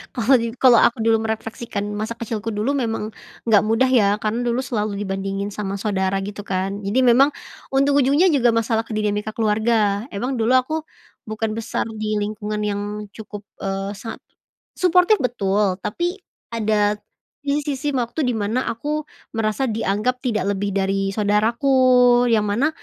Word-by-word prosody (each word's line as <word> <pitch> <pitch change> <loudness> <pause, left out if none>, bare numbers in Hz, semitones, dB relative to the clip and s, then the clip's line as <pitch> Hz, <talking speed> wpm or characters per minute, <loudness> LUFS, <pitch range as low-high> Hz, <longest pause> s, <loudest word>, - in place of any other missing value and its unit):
kalau 245 +1 +3
ni 230 0 -2
kalau 245 -2 +6
aku 240 - +3
dulu 225 -1 +3
merefleksikan 220 -1 -4
masa 220 +3 -4
kecilku 225 -1 -4
dulu 220 +6 -1
memang 225 -5 -2 0.3
nggak 215 -4 +5
mudah 225 +4 +2
ya 210 -6 +3
karena 215 +3 -2
dulu 240 0 0
selalu 210 -4 -2
dibandingin 195 0 -3
sama 200 -1 -3
saudara 195 -2 0
gitu 205 0 -6
kan 195 +1 -3
jadi 205 +6 0
memang 255 +4 +6 0.4
untung 275 +1 +2
ujungnya 280 +7 +3
juga 245 -4 +4
masalah 230 0 +1
ke 225 - -12
dinamika 210 0 -1
keluarga 215 0 +1
emang 245 +7 -3
dulu 230 -1 0
aku, 255 +4 -1 0.6
bukan 220 0 -2
besar 225 - -2 0.2
di 215 0 -1
lingkungan 210 0 -3
yang 205 -1 -1 0.3
cukup, 210 -2 -9 0.2
eee, 195 +1 -3
sangat, 225 +3 -7 0.6
suportif 360 +3 +4
betul 200 -6 +1
tapi, 350 - -3 0.3
ada, 210 -2 +1 0.5
di 285 +1 +1
sisi 285 0 -2
waktu 245 +4 -2
di - - +1
mana 220 +5 -1
aku 295 +6 -3 0.3
merasa 220 +4 0
dianggap 220 +3 -1
tidak 220 -6 0
lebih 200 +1 -2
dari 195 0 0
saudaraku 215 +5 +1 0.6
yang 215 -2 +3
mana, 220 +8 +1
220 Hz, 155 wpm, -21 LUFS, 205-245 Hz, 0.6 s, kalau